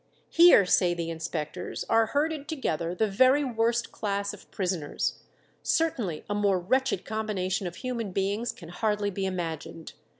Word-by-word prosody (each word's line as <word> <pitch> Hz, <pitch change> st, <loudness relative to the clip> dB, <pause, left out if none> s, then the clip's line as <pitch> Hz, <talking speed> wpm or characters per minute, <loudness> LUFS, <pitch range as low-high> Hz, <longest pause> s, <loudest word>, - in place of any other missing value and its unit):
"Here," 340 Hz, -, +7 dB
say 180 Hz, -1 st, +3 dB
the 165 Hz, -1 st, -3 dB
inspectors, 160 Hz, +1 st, -4 dB
"are 225 Hz, 0 st, +3 dB
herded 295 Hz, +2 st, -1 dB
together 175 Hz, -, -2 dB
the 220 Hz, -, +2 dB
very 260 Hz, +8 st, +4 dB
worst 235 Hz, -2 st, 0 dB
class 200 Hz, -1 st, -2 dB
of 205 Hz, -, -14 dB
prisoners; 180 Hz, -6 st, -2 dB, 0.4 s
certainly 240 Hz, -, 0 dB
a 205 Hz, -, -2 dB
more 205 Hz, -2 st, +2 dB
wretched 255 Hz, +3 st, 0 dB
combination 205 Hz, -4 st, -2 dB
of 175 Hz, -, -7 dB
human 235 Hz, -5 st, -4 dB
beings 200 Hz, +5 st, -1 dB
can 165 Hz, -, -12 dB
hardly 210 Hz, +2 st, -1 dB
be 195 Hz, 0 st, -2 dB
imagined. 165 Hz, -3 st, -5 dB
200 Hz, 145 wpm, -27 LUFS, 180-235 Hz, 0.4 s, Here